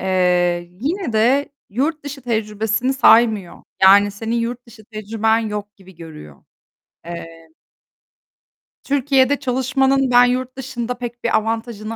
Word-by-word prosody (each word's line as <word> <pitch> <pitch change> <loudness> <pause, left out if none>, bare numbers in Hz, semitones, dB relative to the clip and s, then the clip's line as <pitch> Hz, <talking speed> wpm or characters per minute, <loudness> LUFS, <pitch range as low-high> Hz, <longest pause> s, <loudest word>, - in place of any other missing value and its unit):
Eee, 180 -2 +1
yine 325 - -2
de 250 +6 +2 0.2
yurt 290 +8 -2
dışı 280 -2 -8
tecrübesini 220 +1 -1
saymıyor. 225 -7 +3 0.2
Yani 200 +2 +6
senin 225 +3 -4
yurt 240 +1 -4
dışı 225 -2 -16
tecrüben 220 +1 -1
yok 210 -2 -5
gibi 190 -2 -18
görüyor. 155 - -12 0.6
Eee 165 -1 -9 1.3
Türkiye'de 275 0 +2
çalışmanın, 265 0 +1
ben 245 0 +6
yurt 255 +1 -2
dışında 250 -2 -5
pek 240 -1 -7
bir 235 - +2
avantajını 225 0 -4
230 Hz, 120 wpm, -19 LUFS, 205-255 Hz, 1.3 s, Yani